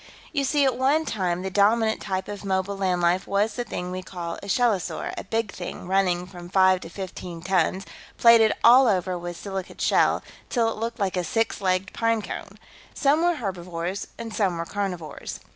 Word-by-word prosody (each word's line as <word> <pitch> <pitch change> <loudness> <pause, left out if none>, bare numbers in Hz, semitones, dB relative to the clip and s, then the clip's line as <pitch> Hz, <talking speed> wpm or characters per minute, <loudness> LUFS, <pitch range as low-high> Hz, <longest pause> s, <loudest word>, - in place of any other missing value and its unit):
"You 280 - +1
see, 285 +1 +3
at 260 -2 +2
one 290 +5 +3
time, 185 - -1
the 190 - -3
dominant 220 +3 +3
type 190 -2 -3
of 205 -1 -7
mobile 190 0 -1
land 185 -2 0
life 175 +2 +2
was 205 +2 +1
the 245 - -3
thing 180 -5 -5
we 185 0 -4
call 175 -2 -6
a 200 - -9
shellosaur, 205 -3 0
a - - -5
big 225 0 -2
thing, 175 0 -7
running 185 -2 +1
from 175 -1 -11
five 185 -1 +4
to 165 - -9
fifteen 175 -2 -7
tons, 190 +1 +1 0.3
plated 230 -2 +7
all 255 +2 +8
over 185 -3 +1
with 175 -1 -6
silicate 195 -2 -6
shell, - - +3 0.3
till 235 -3 +2
it - - -7
looked 230 +1 -3
like 195 -3 -1
a 180 - 0
six 225 +5 -1
legged 185 0 0
pine 230 -1 +1
cone. - - -7 0.4
Some 290 +2 +3
were 350 0 +3
herbivores 180 - -4
and 230 -1 -6
some 190 -6 +1
were 165 - -3
carnivores. 180 -6 -5
195 Hz, 195 wpm, -25 LUFS, 180-225 Hz, 0.4 s, all